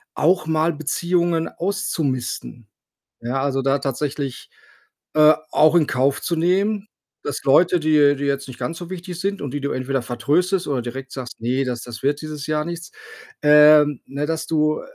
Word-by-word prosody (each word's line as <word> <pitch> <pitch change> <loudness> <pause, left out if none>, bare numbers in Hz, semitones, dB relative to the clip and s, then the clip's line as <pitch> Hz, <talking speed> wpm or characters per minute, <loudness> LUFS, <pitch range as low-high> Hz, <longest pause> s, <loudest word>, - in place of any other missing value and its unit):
auch 175 +2 +2
mal 160 +1 +1
Beziehungen 170 +2 0
auszumisten. 140 - -3 0.5
Ja, 125 +3 -2
also, 135 -1 0
da 135 +1 +2
tatsächlich, 140 -1 -4 0.6
äh, 155 0 +7 0.2
auch 155 +2 +4
in 165 -3 +5
Kauf 135 +3 +1
zu 170 - -1
nehmen, 195 +5 +1 0.4
dass 145 - -4
Leute, 170 +6 +4
die 155 -1 -2
dir 150 -2 +5 0.2
jetzt 140 -1 -2
nicht 130 -2 -10
ganz 130 +7 -4
so 175 +1 -9
wichtig 180 -1 -7
sind 200 +2 -2
und 140 -3 -4
die 145 - -3
du 140 0 -3
entweder 130 0 -2
vertröstest 175 +10 0
oder 135 -4 -1
direkt 130 +2 -7
sagst: 125 -3 -8
„Ne, 125 +4 0
das 125 -2 -3
das 120 -1 -9
wird 145 +2 0
dieses 155 -2 -6
Jahr 155 0 -1
nichts.“, 170 0 -7 0.5
ähm 150 -1 +6
ne, 145 +2 -4
dass 160 0 -2
du, 155 -1 +1
150 Hz, 175 wpm, -21 LUFS, 135-165 Hz, 0.6 s, äh